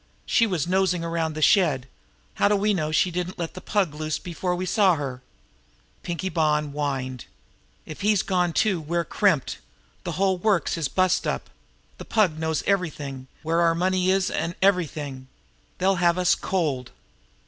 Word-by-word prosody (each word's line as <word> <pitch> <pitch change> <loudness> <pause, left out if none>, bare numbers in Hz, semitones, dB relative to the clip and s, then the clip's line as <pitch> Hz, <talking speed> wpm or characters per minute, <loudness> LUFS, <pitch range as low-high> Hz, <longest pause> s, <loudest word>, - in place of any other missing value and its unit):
She 230 - +3
was 180 -8 -1
nosing 185 -1 +1
around 165 -2 -2
the 155 - -1
shed. 145 -7 +3 0.5
How - - +2
do 205 - +3
we 205 +1 +2
know 155 -5 -1
she 180 +3 +2
didn't 180 +1 -3
let 170 -2 -4
the 185 - -9
Pug 195 -7 0
loose 155 0 -3
before 180 +1 -3
we 180 +1 -3
saw 190 -2 +3
her?" 135 -4 -5 0.8
Pinkie 175 +2 -3
Bonn 150 -4 +1
whined: 135 -4 -3 0.6
"If 155 - -9
he's 205 -1 +3
gone 180 -2 +1
too, 195 +1 +1
we're 170 +2 -1
crimped! 155 - +1 0.4
The 170 - -4
whole 190 +2 +1
works 195 -4 +1
is 165 -4 -1
bust 185 +4 +1
up! - - -3 0.5
The - - -8
Pug 185 -8 +1
knows 160 -1 -1
everything, 145 -9 -2 0.2
where 165 +2 +1
our 165 -1 +3
money 185 +1 +1
is, 190 0 +2
an' 165 +1 -2
everything. 150 -8 0 0.5
They'll 190 +1 +2
have 175 0 +3
us 180 -1 +4
cold!" 145 -9 -1
170 Hz, 170 wpm, -25 LUFS, 155-185 Hz, 0.8 s, us